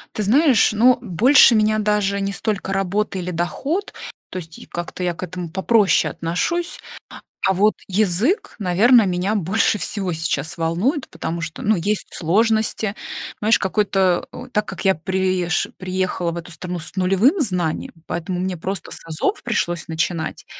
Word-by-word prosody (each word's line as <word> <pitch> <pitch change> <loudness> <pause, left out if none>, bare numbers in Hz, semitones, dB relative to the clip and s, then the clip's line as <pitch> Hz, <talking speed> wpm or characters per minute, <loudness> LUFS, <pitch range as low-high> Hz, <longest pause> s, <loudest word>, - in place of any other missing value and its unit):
Ты 215 - -1
знаешь, 255 +1 +4
ну, 245 +3 +4
больше 235 - +5
меня 215 0 +3
даже 205 -1 +1
не 200 0 -2
столько 200 0 -2
работа 195 +1 -1
или 180 0 -3
доход, 275 - -2 0.4
то 185 - -6
есть 165 -2 -9
как-то 175 +1 -6
я 175 -1 -1
к 185 - -7
этому 180 -1 -5
попроще 195 +2 +2
отношусь. 335 - -2 0.7
А 190 - +4
вот 210 +3 +3
язык, 210 - +1
наверно, 215 +6 +5
меня 185 +4 0
больше 205 +3 +1
всего 185 0 -2
сейчас 160 -1 -2
волнует, 180 - 0
потому 170 +1 -4
что, 160 +1 -6
ну, 215 0 +2
есть 205 +4 -1
сложности. 215 +3 +1 0.4
Знаешь, 220 +2 +3
какой-то 195 -2 +1 0.3
так 210 0 +1
как - - -7
я 190 - +4
приезж 185 0 0
приехала 185 -2 -2
в 170 - -7
эту 170 +1 -9
страну 175 +2 -5
с 175 +3 -8
нулевым 195 - +3
знанием, 180 - -1
поэтому 175 +1 -3
мне 185 -1 -2
просто 190 +4 -5
с - - -8
азов 160 -1 -1
пришлось 175 -1 -1
начинать. 160 0 -2
190 Hz, 155 wpm, -21 LUFS, 175-215 Hz, 0.7 s, больше